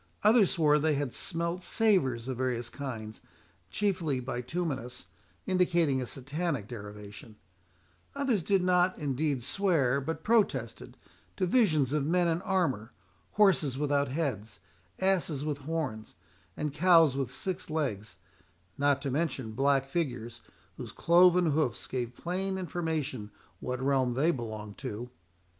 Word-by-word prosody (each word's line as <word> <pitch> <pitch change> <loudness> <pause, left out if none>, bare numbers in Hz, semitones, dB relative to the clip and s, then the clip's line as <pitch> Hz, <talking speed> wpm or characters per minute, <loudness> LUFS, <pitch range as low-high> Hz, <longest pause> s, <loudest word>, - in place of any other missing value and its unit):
Others 215 -2 +6
swore 150 -4 +3
they 155 0 +2
had 140 -3 -2
smelt 170 0 -3
savours 160 - +1
of 130 -2 -3
various 120 -2 -1
kinds, 110 -6 -6 0.5
chiefly 180 -10 0
bituminous, 125 - -4 0.4
indicating 170 -7 +2
a 125 - -4
Satanic 140 - -3
derivation; 105 -1 -9 0.8
others 270 -8 +1
did 195 +1 +2
not 180 0 +3
indeed 145 -2 -1
swear, 140 -8 +1
but 160 +2 -4
protested, 195 - 0 0.4
to 185 - +1
visions 160 - +3
of 150 -2 +1
men 175 +4 +2
in 165 +1 0
armour, 135 - 0 0.4
horses 180 -10 +3
without 145 0 +1
heads, 130 - -3 0.4
asses 175 -7 +1
with 150 -2 -2
horns, 140 -8 -4 0.4
and 150 -2 -2
cows 165 -3 +5
with 135 -3 -1
six 180 +8 -4
legs, 110 - -3 0.6
not 140 -1 +2
to 140 - -2
mention 135 -6 -2
black 135 +3 +2
figures, 120 -7 -3 0.4
whose - - -7
cloven 175 -1 +5
hoofs 145 -4 0
gave 125 -2 -4
plain 190 +4 -2
information 160 - -3 0.3
what 125 +3 -3
realm 130 -2 +1
they 155 +6 +3
belonged 110 -6 -6
to. 120 +4 -6
145 Hz, 130 wpm, -30 LUFS, 125-175 Hz, 0.8 s, Others